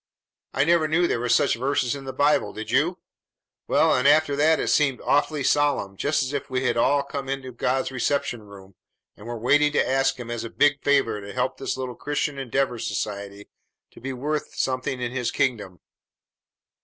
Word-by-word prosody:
I - - +3
never 165 0 +3
knew 170 +3 +2
there 120 - 0
were 120 +1 -2
such - - +3
verses 130 0 0
in 140 -1 -7
the 135 - -4
Bible, 145 -5 +1
did 110 - -6
you? - - +2 0.7
Well, - - +3
and 125 +2 +2
after 150 0 +4
that 155 +3 +3
it - - -1
seemed 140 -4 +2
awfully 145 0 +1
solemn, 145 -10 +1
just 145 +7 0
as 130 +2 -4
if 140 - -4
we 130 0 -1
had 125 - +1
all 140 +4 +2
come 140 -1 -6
into 135 -1 -4
God's 130 +2 -1
reception 130 -2 -1
room 100 -2 -14 0.4
and 105 - -13
were 120 0 -4
waiting 145 +6 +3
to - - +2
ask 135 0 +2
Him 120 -1 -6
as 120 -1 -3
a 115 - -6
big 145 +3 +2
favor 135 -7 +2
to 100 0 -9
help 125 0 -1
this - - -3
little 130 -1 -4
Christian 145 +1 -3
Endeavor 135 -1 -1
Society 100 -2 -4 0.4
to - - -16
be 135 +2 -4
worth 150 +4 -3
something 130 0 -2
in 120 -1 -3
His 125 -2 -2
kingdom. 105 -9 -2
130 Hz, 195 wpm, -24 LUFS, 120-145 Hz, 0.7 s, after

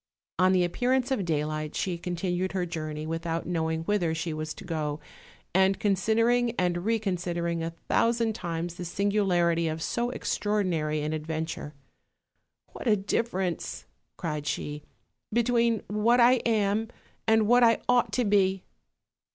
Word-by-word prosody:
On 185 0 +5
the 185 -1 +4
appearance 250 +8 +1
of 210 -8 0
daylight 155 -1 -2
she 185 -2 -1
continued 180 +1 -2
her 185 -2 0
jour 160 -2 -4
ney 150 0 -5
without 165 +1 -3
knowing 160 -2 -1
whither 175 -4 0
she 165 0 -3
was 155 0 -4
to - - -10
go, 155 -4 -3 0.5
and 190 +1 +3
consid 205 +2 +1
ering 240 0 +3
and 175 0 0
reconsidering 175 -6 -1
a 165 - -2 0.2
thousand 230 -1 +2
times 170 -3 -4
the 175 0 -7
singularity 175 -3 +1
of 160 0 -2
so 235 +8 -1
extraordinary 180 -11 -1
an 155 +1 -2
adventure. 155 -1 -4 1.0
"What - - -7
a 215 - +5
difference," 190 -3 -2 0.3
cried 150 -4 -3
she, 150 +1 -3 0.5
"between 235 -1 +2
what 215 +4 +3
I 245 +2 +6
am 215 0 +1 0.4
and 220 -1 +4
what 245 +2 +5
I 230 -1 +6
ought 245 -1 +3
to 250 - +1
be!" 195 -2 +2
185 Hz, 145 wpm, -28 LUFS, 165-220 Hz, 1.0 s, I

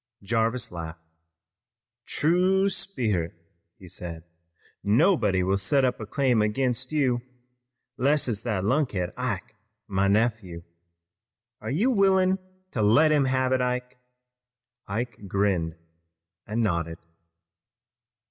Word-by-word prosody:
Jarvis 115 +3 0
laughed. 85 -1 -7 1.0
"True 185 +5 +2
sperrit," 110 - -2 0.4
he 95 - -13
said. 85 -1 -7 0.6
"Nobody 105 - +3
will 95 +2 +1
set 130 +8 +2
up 125 - -1
a 110 - -6
claim 130 -5 +2
ag'inst 125 +4 0
you, 130 -5 +1 0.8
less 140 +3 +2
it's 110 -4 -1
that 105 -6 -2
lunkhead, 105 - 0
Ike, 115 -3 -4 0.3
my 100 0 +1
nephew. 100 -5 0 1.0
Are 110 - -5
you 200 - +2
willin' 190 -3 +3 0.3
to 110 - -2
let 130 +10 +5
him 145 -3 +3
have 130 0 +1
it, 130 -1 +2
Ike?" 125 0 -2 0.9
Ike 115 +4 -3
grinned 95 -4 0 0.7
and 115 +2 0
nodded. 85 -4 -1
115 Hz, 110 wpm, -26 LUFS, 100-135 Hz, 1.0 s, let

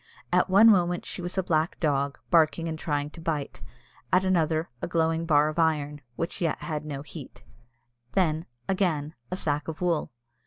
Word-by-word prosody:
At 180 +1 +3
one 200 +4 +7
moment 175 -3 +2
she - - -4
was 175 +2 -4
a 190 - +2
black 160 -1 0
dog, 140 -3 0
barking 165 0 +3
and 160 -1 -4
trying 145 -2 -2
to 165 - -11
bite; 155 -4 -3 0.5
at 185 +1 +4
another, 165 -3 +1
a - - -2
glowing 165 0 0
bar 150 -1 +4
of 155 +2 -3
iron, 150 -3 +1
which 165 +7 -4
yet 165 -3 +1
had 155 -2 -4
no 140 -2 -5
heat; 100 - -10 0.7
then, 160 -4 +1 0.2
again, 165 -6 0 0.2
a 185 - -2
sack 150 -5 -1
of 160 -1 -5
wool. 175 -3 0
160 Hz, 180 wpm, -27 LUFS, 150-175 Hz, 0.7 s, one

